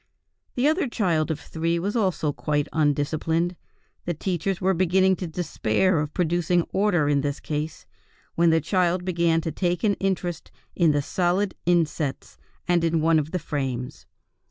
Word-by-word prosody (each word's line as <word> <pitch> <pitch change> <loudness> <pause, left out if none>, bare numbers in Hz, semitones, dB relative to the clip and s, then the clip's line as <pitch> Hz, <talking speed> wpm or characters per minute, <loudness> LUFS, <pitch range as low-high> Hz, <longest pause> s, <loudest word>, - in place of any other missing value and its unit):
The 255 +3 +2
other 315 0 +2
child 175 -9 0
of 155 -2 -2
three 165 +2 -2
was 195 +6 -2
also 185 -9 0
quite 150 0 -1
undisciplined. 160 +3 0 0.5
The 175 - -2
teachers 180 +2 -2
were 190 0 +2
beginning 185 +1 +3
to 180 - -4
despair 160 - 0
of 150 0 -2
producing 175 0 +1
order 190 -7 +2
in 145 -1 +2
this 145 0 -2
case, 150 +1 -4 0.5
when 170 0 +3
the 160 0 +3
child 180 +1 +1
began 170 -2 +2
to 160 - -3
take 175 +4 -1
an 210 -2 +3
interest 180 -4 -2 0.3
in 170 -3 +4
the 145 -1 0
solid 185 +5 0
insets 160 -5 0 0.3
and 175 -1 +2
in 165 -1 +1
one 160 0 +4
of 150 0 -3
the 180 - -2
frames. 135 -6 -4
170 Hz, 160 wpm, -24 LUFS, 155-185 Hz, 0.5 s, in